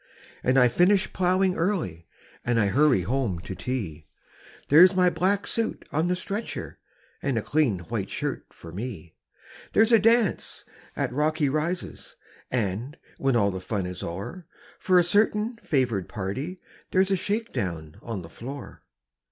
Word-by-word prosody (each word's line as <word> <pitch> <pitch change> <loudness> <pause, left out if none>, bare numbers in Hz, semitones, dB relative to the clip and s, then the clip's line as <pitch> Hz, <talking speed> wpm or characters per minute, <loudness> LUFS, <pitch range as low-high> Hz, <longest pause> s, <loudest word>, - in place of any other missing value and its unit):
And 130 +1 +3
I 125 -1 +7
finish 180 - +3
ploughing 185 +1 +2
early, 165 - -1 0.4
And 120 -1 +1
I 105 -2 +3
hurry 140 -3 +4
home 115 -1 -1
to 95 - -6
tea 90 -11 -4 0.6
There's 180 +6 +8
my 180 -1 +4
black 190 +5 +1
suit 230 -1 -1
on 160 +4 +1
the 180 - +1
stretcher, 200 +4 -4 0.4
And 135 -4 0
a 110 - -1
clean 145 -10 +2
white 85 - -4
shirt - - -3
for 85 - -12
me; 95 -4 -6 0.6
There's 220 +2 +4
a 230 - +7
dance 225 -1 +2 0.3
at - - -1
Rocky 150 +1 +1
Rises, 155 +5 -3 0.3
And, 120 - -2 0.2
when 135 -2 +2
all 100 -3 +3
the 95 -1 -5
fun 95 0 -2
is 90 0 -6
o'er, 100 - -6 0.3
For 185 -1 +3
a 175 - +6
certain 210 +5 +2
favoured 120 - 0
party 130 - -4 0.3
There's 190 +1 +2
a - - +4
shake 210 +5 -2
down 80 -5 -4
on 110 -6 -5
the - - -9
floor. 130 - -9
140 Hz, 155 wpm, -26 LUFS, -, 0.6 s, There's